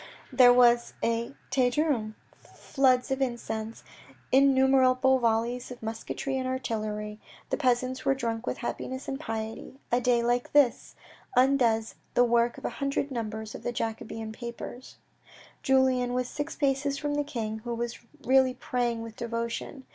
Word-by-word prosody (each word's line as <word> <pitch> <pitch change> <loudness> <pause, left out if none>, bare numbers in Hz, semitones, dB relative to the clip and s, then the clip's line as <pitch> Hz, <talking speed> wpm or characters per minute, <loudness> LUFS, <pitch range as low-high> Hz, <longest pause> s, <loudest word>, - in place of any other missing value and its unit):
There 250 -2 +8
was 240 -1 +4
a 230 +3 -1 0.2
Te 255 -2 +3
Deum, 245 -6 0 0.3
floods 260 -1 +1
of 265 0 -1
incense, 225 -3 -3 0.5
in 275 +1 +6
numerable 265 0 +4
volleys 235 +1 0
of 245 -2 -10
musketry 230 +4 -3
and 255 - -2
artillery; 215 -4 -3 0.3
the - - +1
peasants 255 -1 0
were 270 - +2
drunk 230 -2 -3
with - - -2
happiness 260 +2 -5
and 270 0 -3
piety. 225 0 -6
A 245 +1 +3
day 240 -1 +2
like 245 +1 0
this 280 -5 +3 0.4
undoes 245 -4 +3 0.2
the 245 - +6
work 235 0 +2
of - - -9
a - - -1
hundred 275 0 -1
numbers 220 -3 -4
of - - -8
the 240 - -2
Jacobin 225 -1 -4
papers. 235 +2 -8 0.7
Julien 260 -2 +2
was 250 0 0
six 295 +4 -5
paces 280 0 0
from 290 0 -2
the 290 0 0
king, 225 -7 -4
who 235 +1 -4
was 235 0 -4 0.2
really 260 0 +4
praying 240 -2 -2
with 225 -1 -9
devotion. 235 +3 -4
245 Hz, 155 wpm, -28 LUFS, 230-265 Hz, 0.7 s, There